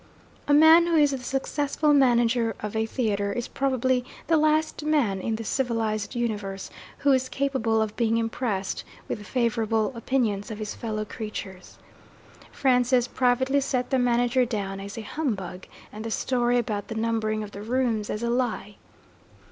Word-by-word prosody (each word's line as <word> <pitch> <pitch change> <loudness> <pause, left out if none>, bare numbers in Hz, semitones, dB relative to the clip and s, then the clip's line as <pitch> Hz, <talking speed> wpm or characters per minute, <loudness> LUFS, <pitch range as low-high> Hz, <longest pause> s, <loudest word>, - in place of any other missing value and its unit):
A 290 - +3
man 320 +3 +7
who 340 - +2
is 295 -2 +5
the 270 - -3
successful 285 +3 0
manager 240 -4 +3
of 210 0 -5
a 220 0 0
theatre 205 -4 -1
is 240 +2 -3
probably 260 -2 0 0.2
the 330 - +3
last 310 0 +2
man 270 -11 +1
in 225 +2 -1
the 225 - -5
civilized 225 -3 -1
universe 205 -5 -3 0.3
who 285 - +2
is 260 -1 +2
capable 260 -6 0
of 215 -1 -5
being 230 -1 +1
impressed 225 -4 -2 0.2
with 210 - -5
favourable 230 -1 0
opinions 230 -4 -1
of 220 - -5
his 215 -1 -4
fellow 215 -2 -4
creatures. 205 -4 -7 0.7
Francis 250 -1 +2
privately 260 +2 +2
set 255 -1 -1
the 265 - +3
manager 245 +1 +2
down 200 -5 -3
as 200 +2 -8
a - - -3
humbug, 205 - -4 0.3
and 215 +1 -7
the 225 - -4
story 245 +1 +1
about 215 -4 -2
the 220 - -6
numbering 220 -1 -1
of 205 - -8
the 200 - -8
rooms 230 -2 0
as 210 - -3
a 235 - 0
lie. 240 -4 -2
235 Hz, 165 wpm, -26 LUFS, 215-260 Hz, 0.7 s, man